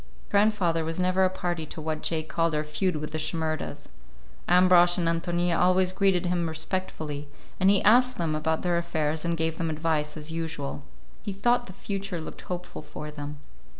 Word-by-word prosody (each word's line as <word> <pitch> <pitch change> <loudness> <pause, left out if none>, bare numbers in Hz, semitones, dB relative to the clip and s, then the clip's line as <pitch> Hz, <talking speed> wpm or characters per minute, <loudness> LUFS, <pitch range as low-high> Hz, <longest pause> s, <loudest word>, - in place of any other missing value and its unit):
Grandfather 200 -6 +3
was 165 +2 -3
never 185 +1 +2
a - - +3
party 175 -3 -3
to 160 - -7
what 155 0 -3
Jake 160 -2 -2
called 165 -1 0
our 150 - 0
feud 155 +4 -1
with 150 0 -4
the 155 - -2
Shimerdas. 155 -2 -3 0.6
Ambrosch 180 -1 +6
and 170 -2 0
Ántonia 170 +1 +1
always 185 0 +4
greeted 190 -2 +2
him 175 -2 0
respectfully, 160 -3 -3 0.3
and 190 +1 +5
he 200 -1 +4
asked 250 +4 +5
them 165 -5 0
about 160 +1 -1
their 175 -1 +2
affairs 160 -2 -1
and 170 -1 0
gave 160 +1 -1
them 165 -2 0
advice 155 -1 -1
as 155 +1 -4
usual. 160 -4 -4 0.4
He 205 - -4
thought 240 +5 +1
the 185 - -9
future 195 -1 -4
looked 160 - -8
hopeful 180 -2 -6
for 150 0 -8
them. 145 0 -7
170 Hz, 185 wpm, -27 LUFS, 155-185 Hz, 0.6 s, Ambrosch